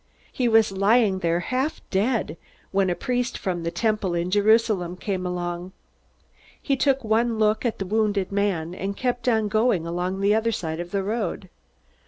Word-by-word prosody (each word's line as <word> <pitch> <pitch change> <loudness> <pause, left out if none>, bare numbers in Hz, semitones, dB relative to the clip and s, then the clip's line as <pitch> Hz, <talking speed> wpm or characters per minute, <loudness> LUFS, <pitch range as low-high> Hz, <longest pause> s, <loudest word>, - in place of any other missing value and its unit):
He 250 - 0
was 225 -2 +4
lying 200 0 +3
there 170 0 0
half 265 - -2
dead, 205 - 0 0.4
when 195 -1 +2
a 175 - 0
priest 245 +2 -2
from 180 -3 -3
the 165 - -2
Temple 210 -2 0
in 170 +1 -1
Jerusalem 205 -3 +2
came 185 -2 -3
along. 175 +1 -4 0.9
He 275 - 0
took 270 0 +1
one 225 +1 +1
look 215 +2 +1
at 230 - -3
the 195 - -3
wounded 205 -1 0
man, 195 -5 -1
and 195 +2 -4
kept 245 -1 -1
on 220 -2 +2
going 215 -5 +1
along 180 +3 -2
the 200 +1 +3
other 225 +1 +1
side 160 -6 -3
of 175 0 -5
the 195 +1 -1
road. 205 -3 -3
200 Hz, 175 wpm, -24 LUFS, 180-225 Hz, 0.9 s, was